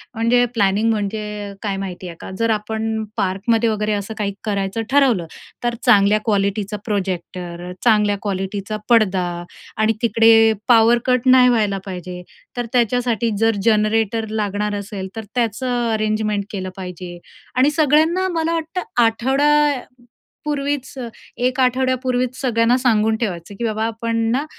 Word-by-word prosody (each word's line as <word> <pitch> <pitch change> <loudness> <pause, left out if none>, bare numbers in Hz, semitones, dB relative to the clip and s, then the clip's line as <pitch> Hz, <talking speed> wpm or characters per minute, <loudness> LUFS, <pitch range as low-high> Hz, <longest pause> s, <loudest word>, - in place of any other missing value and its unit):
म्हणजे 235 +2 +3
प्लॅनिंग 210 0 +2
म्हणजे 210 -1 -3
काय 200 -3 -2
माहिती 185 -2 -6
आहे 170 - -8
का, - - -8
जर 230 0 +1
आपण 220 +1 -2
पार्कमध्ये 220 +5 +1
वगैरे 210 0 -1
असं 205 +1 -3
काही 200 -2 -2
करायचं 200 +1 -2
ठरवलं. 255 -11 +3 0.4
तर 240 -1 0
चांगल्या 205 +1 +5
क्वालिटीचा 205 0 0
प्रोजेक्टर, 180 -3 -4
चांगल्या 210 -3 +3
क्वालिटीचा 200 +1 -3
पडदा 200 -6 +3 0.5
आणि 220 +1 +2
तिकडे 225 -1 +5
पावर 235 0 +6
कट 250 -2 +2
नाही 255 -1 +7
व्हायला 210 -4 +1
पाहिजे, 180 -1 -7 0.4
तर 245 - -1
त्याच्यासाठी 240 -1 +1
जर 225 0 +2
जनरेटर 220 0 +1
लागणार 210 -1 -2
असेल 200 -1 -5
तर 225 - -5
त्याचं 240 +1 0
अरेंजमेंट 215 -1 0
केलं 185 -2 -4
पाहिजे. 180 -2 -8 0.4
आणि 270 +3 +5
सगळ्यांना 315 +4 +3
मला 325 0 0
वाटतं 330 +3 -3 0.2
आठवड्यापूर्वीच 275 +2 -1
अ, 240 - -4 0.3
एक 255 +2 0
आठवड्यापूर्वीच 255 0 +1
सगळ्यांना 235 -1 +2
सांगून 220 -4 +2
ठेवायचं 195 -4 -4
की - - -3
बाबा 220 -1 -1
आपण 230 0 -2
ना, 275 +5 0
220 Hz, 135 wpm, -20 LUFS, 205-245 Hz, 0.5 s, नाही